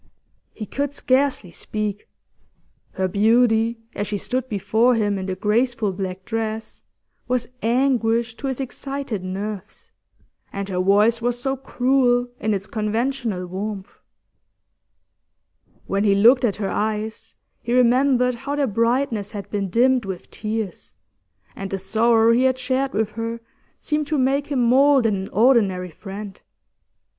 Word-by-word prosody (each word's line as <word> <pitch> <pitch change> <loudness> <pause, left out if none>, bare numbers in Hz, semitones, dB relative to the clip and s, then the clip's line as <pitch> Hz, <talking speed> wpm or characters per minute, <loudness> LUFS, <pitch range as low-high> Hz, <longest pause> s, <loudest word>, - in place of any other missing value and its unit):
He 215 - -5
could 285 +5 -3
scarcely 260 -9 +1
speak; 210 +2 -4 0.8
her 190 -1 0
beauty, 225 +3 +3 0.2
as 205 - -3
she 210 - -2
stood 255 +5 -3
before 225 +4 +2
him 205 -3 0
in 190 - -5
the 190 - -2
graceful 225 +1 +1
black 185 0 -5
dress, 220 -1 -4 0.5
was 245 -2 -1
anguish 235 -1 +1
to 275 - -4
his 265 -1 -3
excited 270 -5 -4
nerves, 200 +2 -6 0.6
and 200 -1 -4
her 180 -1 -2
voice 210 +5 +3
was 240 +1 0
so 270 +2 -1
cruel 250 -2 +1
in 215 0 0
its 195 0 -4
conventional 220 -2 -2
warmth. 195 +2 -5 1.9
When 200 +1 0
he 200 -2 +4
looked 240 +6 +6
at 210 - 0
her 200 -2 -3
eyes, 220 +1 -3 0.3
he 235 - -5
remembered 250 +1 +3
how 270 +4 -4
their 290 -1 +1
brightness 230 -1 0
had 205 -2 -7
been 200 -2 -2
dimmed 250 +3 +3
with 190 -2 -7
tears, 215 -2 -5 0.6
and 195 0 -5
the 195 - -2
sorrow 225 +4 +3
he 245 +3 +3
had 260 0 +2
shared 265 +1 -1
with 215 0 0
her 230 +1 -4 0.4
seemed 300 -1 -2
to 305 0 0
make 270 +2 +1
him 270 -4 0
more 270 +2 +5
than 220 -3 +2
an 190 0 -5
ordinary 200 -6 +2
friend. 195 +3 -9
225 Hz, 145 wpm, -22 LUFS, 205-255 Hz, 1.9 s, looked